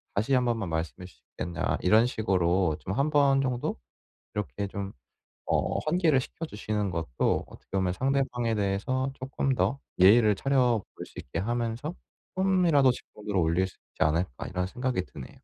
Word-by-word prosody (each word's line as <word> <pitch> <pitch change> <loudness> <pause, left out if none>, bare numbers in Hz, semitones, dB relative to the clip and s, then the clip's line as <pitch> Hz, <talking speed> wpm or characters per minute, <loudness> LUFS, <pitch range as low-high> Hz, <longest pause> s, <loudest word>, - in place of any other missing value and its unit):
다시 110 +7 +1
1 125 -1 +4
번만 115 -7 -1
말씀해 80 +3 -3
주시겠냐." 85 -1 -4
이런 110 +6 +5
식으로 95 -7 +1
좀 95 - -4
1 140 +6 +1
번 140 -2 +4
정도 125 -2 -1 0.6
이렇게 100 -1 -3
좀 100 0 -5 0.6
어 - - +1
환기를 160 -4 +3
시켜주시는 105 - -3
것도 80 -7 0
어떻게 - - -16
보면 90 -1 +1
상대방에 125 -2 0
대해서 105 +7 0
쪼끔 135 0 -1
더 135 +2 +1 0.2
예의를 105 +2 +7
차려볼 125 -3 +2 0.2
수 - - -9
있게 80 - -6
하면서 120 - -2 0.4
쪼끔이라도 180 -8 +4
집중도를 105 -4 -5
올릴 85 +3 +2
수 - - -18 0.2
있지 - - -4
않을까 80 -3 0
이런 90 0 -2
생각이 125 -2 -2
드네요. 70 -4 -10
110 Hz, 340 characters per minute, -28 LUFS, 95-130 Hz, 0.6 s, 예의를